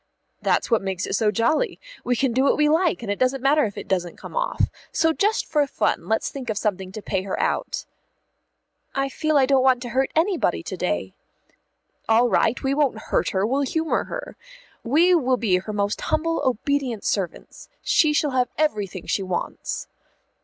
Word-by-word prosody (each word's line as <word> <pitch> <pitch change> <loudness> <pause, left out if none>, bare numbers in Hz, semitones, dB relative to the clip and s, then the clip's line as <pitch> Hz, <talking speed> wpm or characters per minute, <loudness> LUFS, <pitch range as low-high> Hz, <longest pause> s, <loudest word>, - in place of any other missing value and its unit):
"That's - - +1
what 230 - +4
makes 190 -2 -3
it - - -4
so 210 +2 +2
jolly. 235 - +1 0.2
We 245 - +1
can 260 +2 +1
do 260 - +2
what - - +3
we 300 0 +4
like, 320 -3 +2
and 205 - -2
it 205 - -3
doesn't 255 0 +1
matter 290 +2 +4
if 205 - -6
it - - -6
doesn't 180 -3 -1
come - - -10
off. - - +1 0.2
So 320 0 +2
just 420 +6 +1
for 295 -2 +1
fun - - -1
let's 220 0 0
think 260 -4 -7
of 215 - -1
something 190 -3 -2
to 215 - -7
pay 190 - -1
her 190 0 -4
out." - - -1 1.1
"I 275 0 0
feel 310 +2 0
I 270 - +5
don't 270 0 +3
want 260 -1 +4
to 240 - -5
hurt 265 +2 +1
anybody 325 - +1
to - - -5
day." 90 +2 -2 1.0
"All 235 +2 +5
right, 230 +1 +1
we 270 0 +1
won't 280 -5 +1
hurt 220 - -1
her, 190 +1 0
we'll 265 +5 +1
humour 320 +3 0
her. - - -7 0.5
We 320 +9 +4
will 260 -7 +3
be 210 -6 +2
her 190 +4 -5
most 205 0 -1
humble 330 +1 0
obedient 260 -2 -1
servants. 190 -5 -3
She 310 - +3
shall 295 -1 +1
have 250 -1 +1
everything 210 - -1
she - - 0
wants." 185 -2 -4
255 Hz, 195 wpm, -23 LUFS, 205-295 Hz, 1.1 s, I